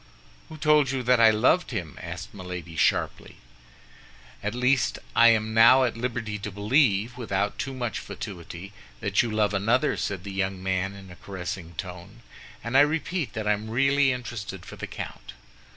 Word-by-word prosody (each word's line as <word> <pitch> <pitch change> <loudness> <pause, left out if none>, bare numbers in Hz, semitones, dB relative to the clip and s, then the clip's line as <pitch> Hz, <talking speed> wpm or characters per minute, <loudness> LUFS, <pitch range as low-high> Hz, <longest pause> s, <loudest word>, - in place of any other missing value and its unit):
"Who 155 - -9
told 150 -3 +4
you 130 -1 -2
that 125 0 +4
I 115 -1 +8
loved 120 +11 +3
him?" 90 - -5
asked - - -7
Milady, 90 -3 -7
sharply. - - 0 1.1
"At 105 +3 -3
least, 125 -2 +2 0.2
I 115 - +7
am 110 -1 +3
now 115 +4 +7
at 120 -3 0
liberty 115 -3 -3
to 105 - -5
believe, 110 +1 +2
without 100 -3 -2
too 135 -1 -3
much 120 -4 -3
fatuity, 90 +2 -8 0.3
that - - +2
you 120 - -2
love 105 -1 +1
another," 115 +9 +2
said 95 -3 -3
the 100 0 -7
young 95 -1 -2
man, 95 +1 -1
in 95 -2 -12
a - - -11
caressing 90 -3 -6
tone, 90 +6 -8 0.4
"and 115 +3 -4
I 135 - +8
repeat 160 +2 0
that 110 -2 -4
I 105 - +4
am 105 +1 -5
really 135 +3 +3
interested 115 -7 -6
for - - -9
the - - -6
count." - - -8
110 Hz, 175 wpm, -26 LUFS, 95-125 Hz, 1.1 s, I